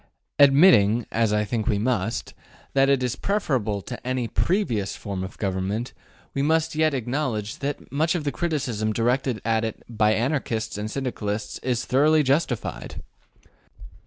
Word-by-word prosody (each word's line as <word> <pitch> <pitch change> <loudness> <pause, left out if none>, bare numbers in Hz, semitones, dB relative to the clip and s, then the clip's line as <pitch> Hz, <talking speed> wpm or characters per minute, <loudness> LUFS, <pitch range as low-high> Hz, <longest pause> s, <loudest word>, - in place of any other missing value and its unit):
Admitting 135 - +6
as 115 -2 +1
I 105 0 +1
think 110 0 -2
we 105 - +2
must 115 -1 -1 0.4
that 135 0 +4
it 135 -2 +3
is 125 0 -1
preferable 125 - -1
to 125 - -7
any 130 -2 -1
PREVIOUS 120 - 0
form 100 -2 -5
of 95 - -8
Government, 100 +4 -2 0.4
we 140 - -1
must 160 +2 +1
yet 155 -1 +2
acknowledge 120 -4 -2
that 140 +1 -4
much 160 +5 +1
of 165 - -2
the 145 - -1
criticism 130 -11 -1
directed 125 +2 +1
against 115 -1 +1 0.2
it - - -23
by 110 -2 +2
Anarchists 115 -3 -1
and 105 +1 -3
Syndicalists 110 -5 -3
is 125 -2 -1
thoroughly 150 +4 +4
justified. 130 - -1
120 Hz, 150 wpm, -24 LUFS, 110-140 Hz, 0.4 s, Admitting